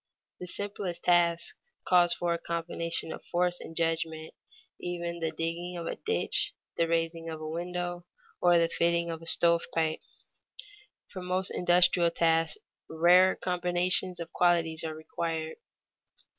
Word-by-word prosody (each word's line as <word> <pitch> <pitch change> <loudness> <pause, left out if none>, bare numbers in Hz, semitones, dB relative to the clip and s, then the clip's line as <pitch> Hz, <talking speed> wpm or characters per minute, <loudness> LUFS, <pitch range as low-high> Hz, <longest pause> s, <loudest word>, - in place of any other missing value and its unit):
_ - - -65 0.4
The 180 - -7
simplest 200 -2 -5
task 170 -1 +2 0.3
calls 175 -1 +4
for 170 0 0
a 170 - -3
combination 170 0 -3
of - - -10
force 175 0 0
and 165 - -10
judgment, 165 -1 -2 0.5
even 170 -1 -4
the 165 -1 -1
digging 170 +2 -4
of 170 - -5
a - - -3
ditch, 450 +1 0 0.2
the 165 - +1
raising 165 0 -1
of 160 -1 -6
a 155 - -6
window, 175 +1 -4 0.3
or 175 -1 +5
the 165 0 +3
fitting 170 0 +1
of 165 0 -6
a 165 - -6
stovepipe. 165 -2 +2 1.1
For 185 - -7
most 185 +1 0
industrial 175 -1 +4
tasks 165 - +1 0.3
rarer 175 +3 +5
combinations 180 0 +1
of 170 0 -7
qualities 165 -2 +2
are 160 -1 -4
required. 160 0 -4
170 Hz, 145 wpm, -29 LUFS, 165-175 Hz, 1.1 s, or